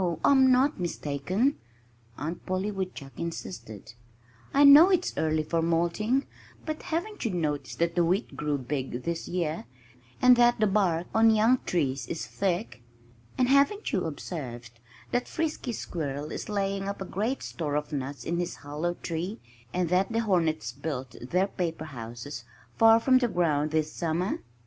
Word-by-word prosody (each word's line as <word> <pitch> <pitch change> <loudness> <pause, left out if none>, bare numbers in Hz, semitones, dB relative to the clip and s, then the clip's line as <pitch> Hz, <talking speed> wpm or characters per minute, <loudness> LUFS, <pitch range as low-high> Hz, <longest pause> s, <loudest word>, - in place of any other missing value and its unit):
I'm 265 -2 +6
not 265 +1 +3
mistaken," 180 - -1 0.6
Aunt 160 +4 -5
Polly 185 +3 -1
Woodchuck 185 -8 -6
insisted. 115 - -6 0.6
"I 280 - +5
know 290 +6 +10
it's 365 -2 +1
early 155 0 +1
for 165 +2 0
molting 170 +10 +1 0.4
but 310 -1 -4
haven't 395 +6 -3
you 230 - 0
noticed 155 -6 -2
that 170 0 +1
the 175 0 +3
wheat 185 +7 0
grew 150 -1 -1
big 130 -1 -4
this 170 -1 -3
year, 170 -3 -2 0.5
and 250 0 +7
that 240 -1 +4
the 215 - +4
bark 190 -5 +1
on 225 +1 +5
young 225 +3 +4
trees 135 -7 0
is 165 - -4
thick? 190 - -2 0.6
And 255 - +3
haven't 280 +11 +3
you 185 - +1
observed 130 -7 -6 0.4
that 245 0 0
Frisky 310 -6 -2
Squirrel 150 -8 -4
is - - -5
laying 195 -1 -1
up 200 - -5
a 190 - -4
great 220 +8 -2
store 150 -4 -3
of 150 0 -2
nuts 135 -2 -4
in 170 +4 -1
his 175 - -2
hollow 155 +5 -3
tree, 175 +7 -4 0.3
and 180 -2 0
that 185 +4 +2
the 230 0 +1
hornets 165 - +1
built 135 -2 -5
their 180 +10 +1
paper 165 -5 -3
houses 120 -1 -7 0.3
far 225 0 +7
from 255 +2 +4
the 245 - +2
ground 155 -7 +1
this 155 0 -1
summer?" 170 +3 -1
175 Hz, 160 wpm, -28 LUFS, 150-225 Hz, 0.6 s, know